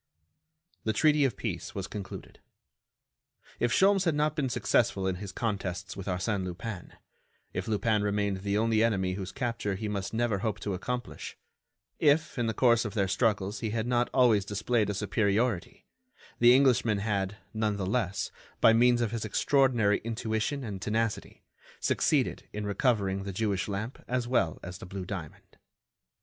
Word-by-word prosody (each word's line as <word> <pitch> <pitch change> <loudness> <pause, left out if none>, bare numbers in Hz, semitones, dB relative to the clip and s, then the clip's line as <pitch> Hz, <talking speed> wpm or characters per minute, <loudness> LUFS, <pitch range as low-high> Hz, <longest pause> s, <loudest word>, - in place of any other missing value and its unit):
The 110 - 0
treaty 150 +4 +4
of 130 - -1
peace 90 -7 -4
was 100 -2 -3
concluded. 100 -2 -8 1.2
If 120 - +1
Sholmes 195 - +4
had 165 -3 +2
not 150 +1 +1
been 140 -4 0
successful 115 -4 +1
in 95 -1 0
his 100 0 -7
contests 95 -4 -3
with 95 0 -7
Arsène 95 +2 -1
Lupin; 90 +2 -6 0.6
if - - -3
Lupin 110 0 +1
remained 100 -1 0
the 100 +1 -1
only 110 0 +3
enemy 95 -5 +1
whose 95 0 -5
capture 115 -5 -2
he 105 +3 -4
must 100 -2 -3
never 115 -3 0
hope 110 0 -2
to 100 - -2
accomplish; 125 +7 -5 0.6
if, 150 -2 +2
in 120 - +1
the 110 - 0
course 115 -2 +4
of 110 -1 -5
their 100 -3 +2
struggles, 105 -1 0
he 110 - -2
had 110 +1 -1
not 120 0 +1
always 120 -6 +4
displayed 105 +2 0
a 105 - -1
superiority, 105 0 0 0.5
the 120 +1 +7
Englishman 125 -5 +3
had, 100 -1 -1 0.2
none 110 -2 0
the 95 - -2
less, 100 -1 -1 0.3
by 115 - +6
means 120 +1 +4
of 115 -3 0
his 115 -2 -3
extraordinary 120 -2 +2
intuition 115 +4 -2
and 100 -5 -5
tenacity, 110 0 -2 0.4
succeeded - - +1
in 105 0 -4
recovering 100 -2 +1
the 100 0 -5
Jewish 100 -1 -1
lamp 110 +6 -5
as 125 -1 -1
well 95 -10 +1
as 90 +1 -7
the - - -9
blue 95 0 -6
diamond. 90 -6 -8
110 Hz, 165 wpm, -29 LUFS, 100-120 Hz, 1.2 s, the